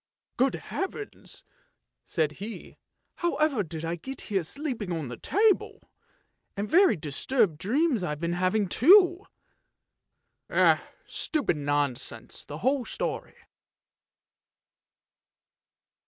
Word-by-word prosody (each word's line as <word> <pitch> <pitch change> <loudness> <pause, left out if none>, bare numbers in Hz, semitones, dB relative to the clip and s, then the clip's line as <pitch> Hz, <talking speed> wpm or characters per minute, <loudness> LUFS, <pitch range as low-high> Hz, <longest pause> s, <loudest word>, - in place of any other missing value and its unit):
" - - -65
Good 265 +1 +2
heavens! 400 +2 -6 0.3
" - - -48 0.3
said 155 -4 0
he, 220 +2 -8 0.2
" - - -54 0.2
however 310 -8 +1
did 165 -3 -6
I 170 +1 -2
get 265 +10 -7
here 195 -3 -1
sleeping 240 - -4
on 160 -6 -3
the 125 - -6
table, 420 - +1 0.8
and 205 +1 -2
very 365 - +5
disturbed 160 - +1
dreams 260 - +1
I've 150 -4 -3
been 170 +1 -1
having 185 +3 +1
too! 360 - +6 1.8
Stupid 290 - -1
nonsense 140 -5 -2
the 145 - -7
whole 265 0 +2
story! - - -4
210 Hz, 110 wpm, -27 LUFS, -, 1.8 s, too